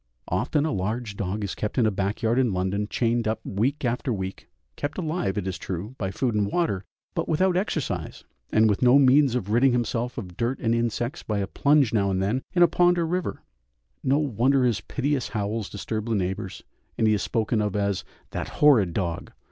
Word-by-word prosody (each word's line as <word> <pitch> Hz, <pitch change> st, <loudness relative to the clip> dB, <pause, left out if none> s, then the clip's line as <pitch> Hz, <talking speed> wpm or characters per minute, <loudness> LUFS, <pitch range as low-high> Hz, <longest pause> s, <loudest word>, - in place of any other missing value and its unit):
Often 150 Hz, 0 st, +1 dB
a 160 Hz, -, 0 dB
large 105 Hz, +3 st, -2 dB
dog 100 Hz, +2 st, -3 dB
is 100 Hz, -, -3 dB
kept 105 Hz, -, -4 dB
in 120 Hz, -, +4 dB
a 110 Hz, -, +3 dB
back 100 Hz, +3 st, -2 dB
yard 115 Hz, +3 st, +2 dB
in 125 Hz, -6 st, +2 dB
London 95 Hz, +3 st, -1 dB
chained 115 Hz, -1 st, 0 dB
up 110 Hz, 0 st, 0 dB
week 125 Hz, +9 st, -1 dB
after 125 Hz, +2 st, -1 dB
week 95 Hz, -3 st, -5 dB, 0.3 s
kept 145 Hz, +1 st, -4 dB
alive, 155 Hz, -, -1 dB
it 100 Hz, -, -1 dB
is 95 Hz, -1 st, -3 dB
true, 95 Hz, +6 st, -5 dB
by 95 Hz, -, -1 dB
food 120 Hz, +5 st, -1 dB
and 105 Hz, -1 st, 0 dB
water, 135 Hz, -, 0 dB, 0.3 s
but -, -, -2 dB
without 180 Hz, +3 st, +2 dB
exercise, 180 Hz, -6 st, -2 dB, 0.3 s
and 110 Hz, +1 st, +5 dB
with 105 Hz, -2 st, +1 dB
no 125 Hz, +2 st, +6 dB
means 135 Hz, -1 st, +5 dB
of 105 Hz, -5 st, -2 dB
ridding 125 Hz, +3 st, +4 dB
himself 120 Hz, +1 st, -1 dB
of 90 Hz, -7 st, -6 dB
dirt 120 Hz, +6 st, -1 dB
and 115 Hz, -2 st, 0 dB
insects 120 Hz, +5 st, -1 dB
by 105 Hz, -, -2 dB
a 100 Hz, -, 0 dB
plunge 140 Hz, +4 st, +3 dB
now 100 Hz, -3 st, +2 dB
and 95 Hz, -1 st, 0 dB
then 105 Hz, +7 st, 0 dB
into 175 Hz, -, +6 dB
a -, -, +3 dB
pond 175 Hz, +2 st, +3 dB
or 170 Hz, -, +1 dB
river. 180 Hz, +2 st, -2 dB, 0.6 s
No 135 Hz, +2 st, +3 dB
wonder 135 Hz, -1 st, +2 dB
his 115 Hz, -7 st, +1 dB
piteous 135 Hz, -, -1 dB
howls 105 Hz, 0 st, -3 dB
disturb 110 Hz, +2 st, -4 dB
the 115 Hz, -, +1 dB
neighbours, 95 Hz, 0 st, -3 dB, 0.3 s
and 110 Hz, -, +2 dB
he 110 Hz, -, +4 dB
is 105 Hz, -, 0 dB
spoken 110 Hz, -1 st, 0 dB
of 105 Hz, -1 st, -1 dB
as 100 Hz, -2 st, 0 dB, 0.3 s
"that -, -, -3 dB
horrid 115 Hz, -, +5 dB
dog!" 85 Hz, -4 st, -3 dB
115 Hz, 210 wpm, -25 LUFS, 100-135 Hz, 0.6 s, no